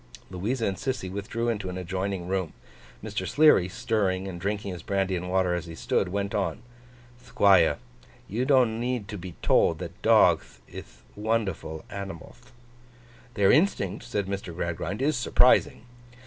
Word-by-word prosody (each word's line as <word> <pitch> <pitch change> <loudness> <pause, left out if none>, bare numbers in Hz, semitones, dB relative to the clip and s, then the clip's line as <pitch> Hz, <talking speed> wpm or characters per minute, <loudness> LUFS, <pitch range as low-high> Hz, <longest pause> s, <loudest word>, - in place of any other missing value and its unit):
Louisa 110 +7 -2
and 95 -2 -1
Sissy 130 -9 -3
withdrew 110 +4 -3
into 105 -5 -2
an 90 - -5
adjoining 95 0 -3
room; 95 -3 -2 0.5
Mr. - - -4
Sleary, 150 - +5
stirring 100 -4 -1
and 85 -2 -7
drinking 100 0 -2
his 90 - -8
brandy 95 0 -1
and 90 +1 -4
water 95 -1 +1
as 90 0 -3
he 85 - -8
stood, - - 0
went 100 +1 -2
on: 100 +1 -2 0.6
'Thquire,—you 95 - +1
don't 130 -5 +3
need 120 -3 -2
to 105 -2 -6
be 90 -1 -8
told - - +3
that - - -8
dogth - - +3
ith - - -12
wonderful 105 -7 -2
animalth.' 100 - -9 0.8
'Their 100 -2 +4
instinct,' 115 - +1
said 105 -5 -2
Mr. 95 -3 -5
Gradgrind, 85 +6 -3
'is 150 +1 +2
surprising. 120 -1 +3
100 Hz, 150 wpm, -26 LUFS, 90-115 Hz, 0.8 s, Sleary